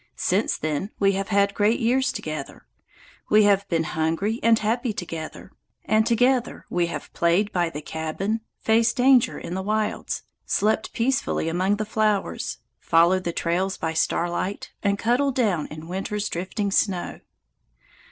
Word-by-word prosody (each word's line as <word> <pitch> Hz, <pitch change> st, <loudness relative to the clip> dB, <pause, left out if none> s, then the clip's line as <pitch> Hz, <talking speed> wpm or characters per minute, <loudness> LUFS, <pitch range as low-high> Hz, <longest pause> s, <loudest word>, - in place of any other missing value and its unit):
Since -, -, 0 dB
then 155 Hz, +5 st, -2 dB
we 195 Hz, -1 st, +3 dB
have 195 Hz, 0 st, -2 dB
had 200 Hz, -1 st, +2 dB
great 210 Hz, +3 st, +2 dB
years 260 Hz, +3 st, +2 dB
together. 155 Hz, -, -6 dB, 0.6 s
We 215 Hz, 0 st, +6 dB
have 200 Hz, -1 st, +3 dB
been 165 Hz, -2 st, +1 dB
hungry 165 Hz, +9 st, -1 dB
and 230 Hz, -1 st, +5 dB
happy 230 Hz, +2 st, -1 dB
together, 165 Hz, -1 st, -7 dB, 0.3 s
and 215 Hz, +1 st, +3 dB
together 245 Hz, +1 st, +1 dB
we 175 Hz, -1 st, +1 dB
have 155 Hz, -4 st, -7 dB
played 175 Hz, +5 st, +2 dB
by 175 Hz, -2 st, +1 dB
the 150 Hz, -2 st, -7 dB
cabin, 160 Hz, +9 st, -3 dB, 0.2 s
faced 225 Hz, +1 st, +2 dB
danger 255 Hz, -1 st, +4 dB
in 170 Hz, -, -6 dB
the 190 Hz, -, -2 dB
wilds, 215 Hz, +2 st, -2 dB, 0.2 s
slept 215 Hz, +1 st, 0 dB
peacefully 250 Hz, -8 st, 0 dB
among 185 Hz, +4 st, +1 dB
the 215 Hz, +1 st, -3 dB
flowers, 215 Hz, -2 st, -1 dB, 0.2 s
followed 175 Hz, +3 st, +3 dB
the 170 Hz, -, 0 dB
trails 180 Hz, +3 st, -1 dB
by 160 Hz, 0 st, -2 dB
starlight, 175 Hz, +4 st, -1 dB
and 200 Hz, -1 st, +1 dB
cuddled 250 Hz, +5 st, +1 dB
down 200 Hz, -, +1 dB
in 155 Hz, +1 st, -9 dB
winter's 200 Hz, +3 st, -3 dB
drifting 195 Hz, +4 st, -3 dB
snow. 190 Hz, -3 st, 0 dB
200 Hz, 150 wpm, -24 LUFS, 170-220 Hz, 0.6 s, We